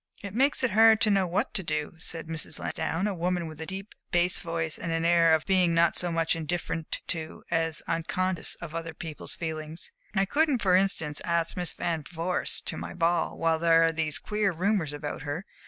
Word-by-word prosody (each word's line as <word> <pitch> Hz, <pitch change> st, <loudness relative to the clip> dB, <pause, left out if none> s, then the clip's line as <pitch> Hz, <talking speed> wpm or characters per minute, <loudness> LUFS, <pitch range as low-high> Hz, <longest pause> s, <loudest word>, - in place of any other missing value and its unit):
"It 200 Hz, -1 st, -6 dB
makes 265 Hz, +3 st, +2 dB
it 255 Hz, -, +2 dB
hard 220 Hz, +2 st, +6 dB
to 215 Hz, -, +5 dB
know 195 Hz, -2 st, +3 dB
what 175 Hz, -, -1 dB
to -, -, +3 dB
do," 155 Hz, -3 st, -3 dB
said 165 Hz, 0 st, -3 dB
Mrs. 160 Hz, -1 st, -2 dB
Lansdowne, 170 Hz, +5 st, -2 dB
a 210 Hz, -, 0 dB
woman 175 Hz, 0 st, -1 dB
with 160 Hz, 0 st, -8 dB
a 160 Hz, -, -5 dB
deep 195 Hz, +2 st, -6 dB, 0.2 s
bass 175 Hz, +1 st, +2 dB
voice 165 Hz, -2 st, -2 dB
and 170 Hz, -, -3 dB
an 165 Hz, 0 st, 0 dB
air 170 Hz, -1 st, +5 dB
of 155 Hz, -, -3 dB
being 180 Hz, -3 st, +3 dB
not 165 Hz, 0 st, +4 dB
so 175 Hz, -1 st, +1 dB
much 165 Hz, 0 st, +1 dB
indifferent 165 Hz, 0 st, -3 dB
to, 160 Hz, -1 st, -5 dB
as 165 Hz, -1 st, +1 dB
unconscious 170 Hz, +1 st, 0 dB
of 165 Hz, -2 st, -9 dB
other 165 Hz, -1 st, -5 dB
people's 160 Hz, -2 st, -5 dB
feelings. 160 Hz, -1 st, -4 dB, 0.2 s
"I 195 Hz, 0 st, +3 dB
couldn't 285 Hz, +1 st, +1 dB
for 185 Hz, -2 st, +4 dB
instance 175 Hz, -6 st, +1 dB
ask 170 Hz, -1 st, 0 dB
Miss 180 Hz, -1 st, -1 dB
Van 165 Hz, -2 st, -2 dB
Vorst 175 Hz, +1 st, 0 dB
to -, -, -4 dB
my -, -, -6 dB
ball 170 Hz, -1 st, +1 dB
while 165 Hz, -1 st, +1 dB
there 165 Hz, 0 st, +5 dB
are 165 Hz, -, +3 dB
these 160 Hz, -2 st, -1 dB
queer 210 Hz, +3 st, 0 dB
rumors 180 Hz, -2 st, 0 dB
about 145 Hz, -1 st, -5 dB
her. 145 Hz, +7 st, -4 dB
170 Hz, 205 wpm, -28 LUFS, 160-185 Hz, 0.2 s, hard